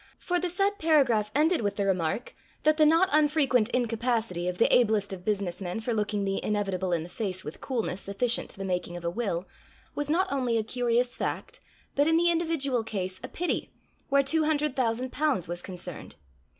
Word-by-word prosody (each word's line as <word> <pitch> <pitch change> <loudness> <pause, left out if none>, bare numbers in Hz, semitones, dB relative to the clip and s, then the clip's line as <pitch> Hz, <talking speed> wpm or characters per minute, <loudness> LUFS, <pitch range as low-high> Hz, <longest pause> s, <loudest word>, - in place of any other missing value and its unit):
For 355 0 -1
the 355 0 -1
said 395 +3 0
paragraph 265 -10 +3
ended 315 +2 +3
with 205 -2 -1
the 200 - -1
remark, 185 +4 -1 0.3
that 310 0 +4
the 305 -1 +6
not 330 +4 +5
unfrequent 290 -6 +3
incapacity 230 -6 0
of 180 0 -2
the - - +3
ablest 215 -5 +2
of 180 -2 -8
business 200 -3 -2
men 180 +3 -3
for 230 +2 -2
looking 210 -2 -1
the 195 0 -1
inevitable 195 -3 -1
in 165 -2 0
the - - -8
face 185 -1 -4
with 150 - -8
coolness 225 -7 -2
sufficient 230 +5 0
to - - -14
the 195 - -4
making 180 -1 -2
of 175 - -8
a 170 - 0
will, 190 -4 -2 0.5
was 290 0 -3
not 350 +5 +2
only 250 -4 +1
a 220 - +1
curious 245 +1 0
fact, - - -4 0.3
but 285 +2 +3
in 325 - +4
the 345 +1 +4
individual 320 -8 0
case 190 -4 -4
a - - -4
pity, 355 +1 -2 0.4
where 280 0 +4
two 315 +3 +1
hundred 300 -2 +1
thousand 250 0 0
pounds 285 - 0
was 175 +1 -3
concerned. 180 -2 -7
230 Hz, 200 wpm, -28 LUFS, 195-295 Hz, 0.5 s, the